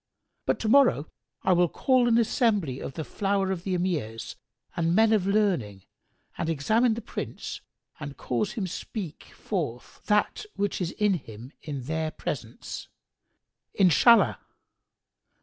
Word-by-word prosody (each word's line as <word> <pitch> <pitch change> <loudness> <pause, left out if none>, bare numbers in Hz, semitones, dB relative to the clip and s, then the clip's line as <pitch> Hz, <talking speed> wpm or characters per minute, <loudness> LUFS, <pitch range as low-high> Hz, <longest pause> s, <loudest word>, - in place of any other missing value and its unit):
But - - +1
to 220 - -1
morrow 240 - +4 0.3
I 185 - +4
will 175 -1 +3
call 255 - +2
an 230 -1 +4
assembly 210 - +1
of - - -6
the 160 - -3
flower 195 +2 0
of 185 -3 -2
the 185 -1 -1
Emirs 150 -12 -2 0.4
and 170 0 +1
men 220 +1 +5
of 200 -3 +2
learning 175 - +1 0.6
and 165 -1 -1
examine 220 - +2
the 230 - -6
Prince - - -6 0.4
and 140 -3 -7
cause 120 -2 -1
him 215 -5 -2
speak 180 -1 -6
forth 145 - -5
that 210 - +1
which 200 -1 -1
is 175 -1 -2
with 205 -5 +2
him 115 +5 -10
in 140 -4 -5
their 160 +3 -2
presence, 120 -6 -6 0.9
Inshallah!" 200 +6 +5
180 Hz, 140 wpm, -27 LUFS, 145-215 Hz, 0.9 s, men